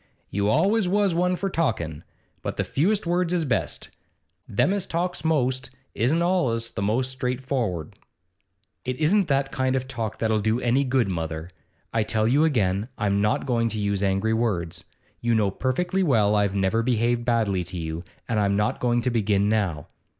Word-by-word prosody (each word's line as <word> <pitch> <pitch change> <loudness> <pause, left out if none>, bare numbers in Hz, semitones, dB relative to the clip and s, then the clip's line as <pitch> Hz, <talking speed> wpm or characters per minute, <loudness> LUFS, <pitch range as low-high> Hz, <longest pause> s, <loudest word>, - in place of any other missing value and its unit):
You 100 +1 +1
always 190 - +3
was 200 0 +2
one 180 +2 +2
for 195 - -2
talkin', 110 - -1 0.4
but - - -4
the - - +1
fewest 195 +8 +1
words 175 0 +1
is 170 -3 +1
best. 130 - -2 0.6
Them 185 - +2
as 200 -2 -2
talks 175 +2 -2
most 130 -5 +1 0.2
isn't 155 +9 +1
allus 125 -11 0
the - - -4
most 125 +6 0
straightfor'ard.' 125 - -2 0.9
'It 130 0 -3
isn't 185 +5 +3
that 135 -1 +1
kind 130 0 0
of 130 0 -2
talk 115 -5 -4
that'll 110 -1 +1
do 110 +3 +1
any 125 +3 +2
good, 130 -3 +1
mother. 80 -2 -4 0.4
I 115 - +2
tell 110 0 +1
you 140 +6 +4
again, 105 -8 +1
I'm 100 -1 +1
not 105 +5 +1
going 115 -3 +1
to 110 0 -4
use 100 -1 0
angry 100 +3 +1
words; 90 -7 -1 0.3
You 120 -1 +1
know 105 -3 +2
perfectly 175 - -1
well 110 - +3
I've 100 -1 +1
never 100 +3 +2
behaved 120 0 +1
badly 110 -6 +1
to 90 +1 -7
you, 80 0 -4 0.3
and 110 -2 0
I'm 100 -1 +2
not 105 +1 0
going 120 -1 +1
to 125 - 0
begin 105 -3 +2
now. 95 -9 0
115 Hz, 180 wpm, -25 LUFS, 100-140 Hz, 0.9 s, you